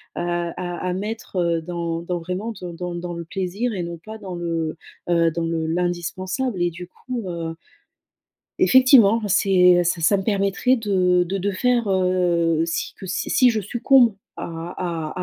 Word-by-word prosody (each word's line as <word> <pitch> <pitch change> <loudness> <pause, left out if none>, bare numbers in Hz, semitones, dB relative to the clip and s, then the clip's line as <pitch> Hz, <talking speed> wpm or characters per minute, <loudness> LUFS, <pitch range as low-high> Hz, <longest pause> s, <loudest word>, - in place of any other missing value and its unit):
à 175 +1 -3
à - - -1
mettre, 210 +3 -5
heu, 170 -2 +1
dans 170 0 -3
dans 175 +1 -3
vraiment 185 +7 -4
dans 175 -1 -7
dans 175 +1 -5
dans 175 0 -5
le 170 0 -5
plaisir 195 +7 -3
et 180 - -2
non 170 -1 -6
pas 220 0 -8
dans 195 -4 -8
le, 165 -2 -3 0.3
heu, 170 -1 +4
dans 165 +1 -3
le 165 -1 -2
l'indispensable 180 +6 -2
et 175 - +1
du 175 +2 -9
coup, 245 +5 -6
heu 165 -1 -4 1.0
effectivement 255 -4 +6
c'est 180 -2 +5
ça 175 0 0
ça 190 +5 +4
me - - -2
permettrait 200 +5 +1
de 185 -5 +2
de 190 +3 -3
de 200 +2 -1
faire, 240 +2 +1
heu, 175 -3 +2
si 165 - -3
que 190 - -10
si 185 - -3
si 250 -1 +5
je 220 -2 -1
succombe 240 +2 +4 0.2
à - - -5 0.7
à 180 - -4
180 Hz, 175 wpm, -22 LUFS, 170-205 Hz, 1.0 s, effectivement